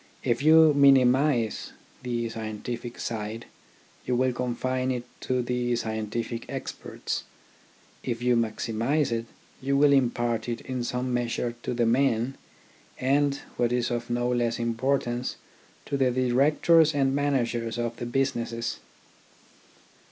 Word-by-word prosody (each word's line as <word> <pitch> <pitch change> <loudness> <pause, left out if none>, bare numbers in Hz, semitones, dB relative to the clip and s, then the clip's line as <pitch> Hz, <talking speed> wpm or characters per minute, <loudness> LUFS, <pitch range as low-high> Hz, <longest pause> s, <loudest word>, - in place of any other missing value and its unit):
If 120 0 +1
you 160 0 +7
minimise 135 -3 +3 0.3
the 120 -2 -2
scientific 115 +2 -5
side, 110 0 -4 0.6
you 125 - 0
will 130 +1 +2
confine 130 +1 -1
it 125 -2 -1 0.2
to 125 -1 -1
the 120 0 0
scientific 110 +1 -3
experts; - - -5 0.8
if 120 -2 -2
you 125 0 +2
maximise 115 +5 0
it, 115 0 -2 0.3
you 140 +1 +1
will 145 0 +5
impart 120 -3 +1
it 120 -1 -3
in 130 -2 -4
some, 125 +1 -2
measure 120 0 -1
to 125 - -3
the 120 -1 +2
men, 125 +1 +2 0.6
and 140 +2 +2
— - - -24
what 120 -1 +1
is 125 0 0
of 120 0 -3
no 120 0 0
less 120 -2 0
importance 120 +1 -1 0.3
— - - -30
to 140 - -2
the 130 -2 +3
directors 145 +6 +3
and 135 -1 +2
managers 120 -5 0
of 120 0 -2
the 120 - -4
businesses. 120 -2 -1
120 Hz, 135 wpm, -27 LUFS, 115-135 Hz, 0.8 s, you